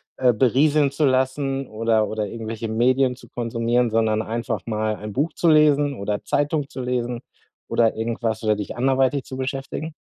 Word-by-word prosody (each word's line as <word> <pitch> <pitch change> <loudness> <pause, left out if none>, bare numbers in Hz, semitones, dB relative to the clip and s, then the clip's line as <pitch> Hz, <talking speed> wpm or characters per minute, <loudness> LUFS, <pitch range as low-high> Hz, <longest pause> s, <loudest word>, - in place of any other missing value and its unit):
äh, 125 -2 +3
berieseln 140 +5 +3
zu 145 +2 0
lassen 135 +1 0
oder 110 -1 +1
oder 110 0 -2
irgendwelche 115 +1 -5
Medien 125 +3 +2
zu 130 - -16
konsumieren, 120 0 0
sondern 110 -1 +2
einfach 115 -2 -3
mal 110 -1 -1
ein 105 0 -8
Buch 150 +6 -1
zu 175 - 0
lesen 145 -2 +4
oder 105 -3 -3
Zeitung 145 0 0
zu 130 - -6
lesen 125 -1 -2 0.5
oder 115 -1 +2
irgendwas 115 0 -2
oder 110 -1 +2
dich 105 -1 -5
anderweitig 135 +2 +1
zu 130 - -7
beschäftigen? 135 +4 -4
125 Hz, 165 wpm, -22 LUFS, 110-135 Hz, 0.5 s, lesen